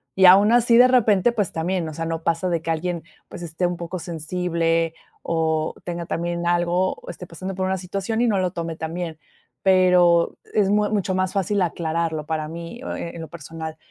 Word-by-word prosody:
y 190 - +5
aun 195 +4 +8
así, 240 0 +4
de 245 +2 +8
repente, 230 -3 +4
pues 210 -5 -1
también, 170 +1 -1
o 155 - -6
sea, 165 +2 -4
no 165 0 -3
pasa 170 +2 0
de 170 -2 0
que 165 - -6
alguien 170 +1 -2 0.3
pues - - -9
esté 165 +2 -2
un 175 - -3
poco 170 +2 -5
sensible 165 0 -1 0.3
o 160 -1 0
tenga 170 -1 -4
también 170 0 -2
algo 175 +2 +1
o - - -13
esté 180 - -8
pasando 185 +3 -6
por 190 - -1
una 190 - 0
situación 195 +4 -3
y 245 - +3
no 205 -4 +2
lo 185 -1 0
tome 165 -1 -4
tan 160 +1 -5
bien, 170 -3 -4 0.4
pero 180 -3 +4 0.2
es 205 -2 +3
muy 210 0 +2
mucho 200 -3 0
más 185 0 0
fácil 200 0 0
aclararlo 165 -2 -1
para 155 -1 -2
mí, 170 +9 -8
oh, - - -4
eh, 170 - -6
en 170 - -7
lo 160 - -8
personal, 160 0 -7
175 Hz, 210 wpm, -23 LUFS, 165-190 Hz, 0.4 s, aun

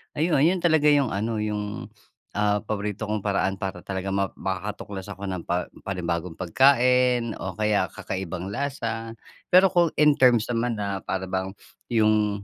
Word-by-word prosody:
Ayun, 155 -2 +2
yun 180 +3 +3
talaga 160 -3 +4
yung 140 -3 +3
ano 110 +2 -2
yung, 105 -1 -3 0.5
ah, 105 0 +2
paborito 105 0 -4
kong 105 -1 -2
paraan 100 -1 0
para 95 -2 -5
talaga 95 +1 -4
ma 100 0 +1
makakatuklas 95 0 -5
ako 100 -1 -8
ng 95 -3 -4
pa 90 +1 -1 0.2
panibagong 85 -2 -3
pagkain 125 - +3
o 95 -2 -5
kaya 105 -3 +1
kakaibang 95 +1 -5
lasa. 115 -3 -3 0.3
Pero 185 +1 +6
kung 175 -2 +4
in 150 0 +5
terms 120 -3 +4
naman 120 0 0
na 100 -2 -3
para 95 0 -3
bang 95 +1 -2 0.3
yung 105 -3 +2
105 Hz, 155 wpm, -25 LUFS, 95-120 Hz, 0.5 s, Pero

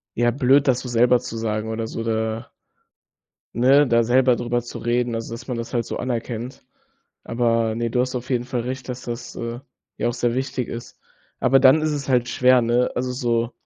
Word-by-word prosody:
ja, 120 0 +2
blöd, 135 +2 +3
das 125 -1 +3
so 125 - -6
selber 120 +1 +4
zu 115 -2 -7
sagen 110 0 -2
oder 110 0 -3
so 115 - -5
da 110 0 -2 1.0
ne, 135 +4 +5
da 115 -1 +4
selber 125 +1 +4
darüber 120 0 -1
zu 120 - -8
reden. 120 0 0
Also, 115 0 -5
dass 120 +3 -10
man 125 - -2
das 115 +2 -6
halt 120 -2 0
so - - -5
anerkennt. 120 0 -4 0.6
Aber 115 -1 +1
ne, 115 0 -2
du 125 - +1
hast 130 +1 -1
auf 125 +1 -5
jeden 120 -1 0
Fall 125 -1 -3
recht, 130 +1 -5
dass 125 0 -5
das, 120 0 -6
äh, 115 +1 -5 0.4
ja 120 - 0
auch - - -1
sehr 120 0 0
wichtig 130 -1 -2
ist. 115 0 -8 0.4
Aber 135 +1 +4
dann 140 +4 +6
ist 155 - +1
es 145 -1 -4
halt 125 -2 +2
schwer, 125 0 +4
ne? 120 +2 +2
Also 125 0 -1
so 120 -1 -1
120 Hz, 210 wpm, -22 LUFS, 115-125 Hz, 1.0 s, dann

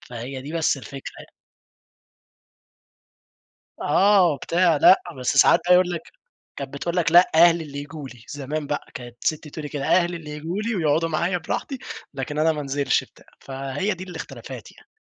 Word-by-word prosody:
فهي 125 +2 -7
دي 145 +3 -8
بس 165 -3 +1
الفكرة 135 0 -9
يعني. - - -13 2.5
آه 190 +3 +4
وبتاع 165 +3 +2
لأ، 185 - +6 0.2
بس 125 - 0
ساعات - - +6
بقى 180 - +5
يقول 180 0 +5
لك، 170 -2 -6 0.4
كانت 140 -1 -7
بتقول 170 +5 -3
لك 165 -2 +2
لأ 175 +2 +7
أهلي 170 0 +6
اللي 140 -2 -9
ييجوا 145 0 -8
لي، 125 -3 -14
زمان 145 +1 -4
بقى، 145 - -3
كانت 120 -1 -9
سِتّي 155 0 -1
تقول 155 +1 -7
لي 150 - -5
كده، 140 -2 -4
أهلي 175 +1 +2
اللي 155 -2 -11
ييجوا 160 +7 -4
لي 225 +1 -2
ويقعدوا 165 -1 +1
معايا 170 +3 0
براحتي، 180 - -4 0.4
لكن 140 +2 -5
أنا 160 +1 +4
ما 150 - -4
أنزلش 140 -1 0
بتاع، - - -20 0.2
فهي 135 +9 -3
دي 185 0 -8
الإختلافات 180 -3 -9
يعني. - - -21
155 Hz, 175 wpm, -23 LUFS, 140-175 Hz, 2.5 s, لأ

